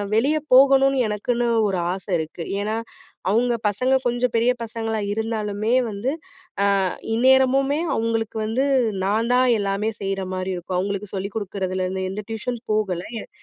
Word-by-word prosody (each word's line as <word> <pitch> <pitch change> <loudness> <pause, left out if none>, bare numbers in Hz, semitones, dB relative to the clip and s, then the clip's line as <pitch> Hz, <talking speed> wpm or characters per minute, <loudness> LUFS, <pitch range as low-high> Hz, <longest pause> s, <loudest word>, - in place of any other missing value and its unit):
வெளிய 280 +8 +3 0.2
போகணும்னு 270 +1 +6
எனக்குன்னு 235 +3 -1 0.2
ஒரு 190 - -1 0.2
ஆசை 190 0 -7
இருக்கு. 160 +2 -5 0.2
ஏன்னா, 215 +2 -1 0.5
அவுங்க 240 +4 +2
பசங்க 255 +6 +1
கொஞ்சம் 245 0 +1
பெரிய 230 +2 +4
பசங்களா 225 -1 -3
இருந்தாலுமே 215 0 -1 0.2
வந்து, 215 +6 -2 0.5
அ - - +3 0.5
இந்நேரமுமே 265 +3 +4 0.2
அவுங்களுக்கு 225 -1 -1
வந்து, 235 +5 0 0.4
நான் 220 +5 +1
தான் 255 +1 +4
எல்லாமே 200 +2 -1
செய்ற 195 -1 -2
மாரி 185 0 -3
இருக்கும். 180 +1 -4
அவுங்களுக்கு 200 +1 -3
சொல்லிக் 195 +1 -4
குடுக்குறதுலருந்து, 190 -2 -2
எந்த 210 +2 -5
டியூஷன் 230 +2 -3
போகல, 195 -5 0 0.2
என் - - -10
220 Hz, 140 wpm, -23 LUFS, 200-245 Hz, 0.5 s, போகணும்னு